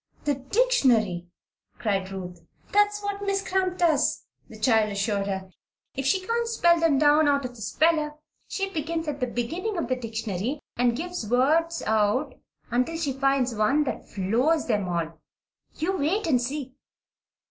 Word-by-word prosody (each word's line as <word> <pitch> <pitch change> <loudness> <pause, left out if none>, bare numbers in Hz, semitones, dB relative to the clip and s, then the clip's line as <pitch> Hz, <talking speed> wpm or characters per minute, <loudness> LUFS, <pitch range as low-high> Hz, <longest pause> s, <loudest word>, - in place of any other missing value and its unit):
"The 290 - +1
dictionary!" 260 - +2 0.5
cried 195 -4 -1
Ruth. 180 -2 -7 0.3
"That's 415 0 +2
what 405 0 -3
Miss 395 -1 -1
Cramp 370 -1 0
does," 320 -5 +2 0.2
the - - -11
child 220 -4 +3
assured 200 0 -1
her. 190 -1 -4 0.4
"If 270 0 -2
she 375 +7 +2
can't 465 +2 0
spell 345 -7 +3
them 325 -4 +3
down 295 +1 +5
out 280 -2 +2
of 250 -1 -6
the 225 - -12
speller, 305 +5 +1 0.3
she 390 -1 -3
begins 325 0 -3
at 290 -1 -3
the 250 - 0
beginning 335 - -3
of 335 - -2
the 255 - +2
dictionary 225 +1 -3 0.2
and 240 -1 +2
gives 350 -8 -4
words 315 +7 +2
out 220 +6 +1 0.4
until 250 +7 0
she 295 -5 -1
finds 270 -2 +1
one 245 +8 +2
that 285 - -5
floors 240 - +1
them 205 -6 0
all. 165 -2 -3 0.6
You 360 +5 0
wait 370 +6 0
and 265 -7 +2
see!" 265 +1 -4
275 Hz, 160 wpm, -26 LUFS, 220-330 Hz, 0.6 s, down